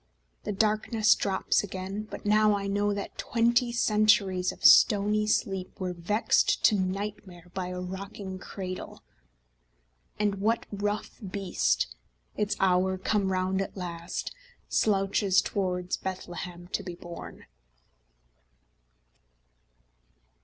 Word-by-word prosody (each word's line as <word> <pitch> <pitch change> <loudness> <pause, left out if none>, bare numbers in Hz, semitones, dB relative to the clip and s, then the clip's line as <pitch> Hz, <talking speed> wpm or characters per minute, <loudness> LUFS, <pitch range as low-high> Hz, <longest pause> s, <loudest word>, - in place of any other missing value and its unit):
The - - -1
darkness 215 +1 +3
drops 195 +1 0
again 195 +2 -5
but - - -8
now 210 0 +4
I 200 - -4
know 205 +1 +1
That 200 0 -5
twenty 235 +1 +2
centuries 210 -5 +3
of - - -8
stony 210 +1 +6
sleep 195 -2 -1
Were 185 -1 -2
vexed 190 +6 +2
to 215 - +6
nightmare 190 -2 -4
by 185 -1 -3
a 180 0 -5
rocking 190 +1 -6
cradle, 185 -1 -7 1.2
And 205 -2 0
what 225 +3 +1
rough 205 +1 -3
beast, 195 - 0 0.5
its 210 0 0
hour 190 0 +2
come 195 0 0
round 185 +1 0
at 195 - -5
last, 170 -2 -5 0.4
Slouches 195 -1 +2
towards 180 -2 -1
Bethlehem 175 -1 -6
to - - -2
be 180 -2 -7
born? 170 0 -10
195 Hz, 110 wpm, -28 LUFS, 185-210 Hz, 1.2 s, stony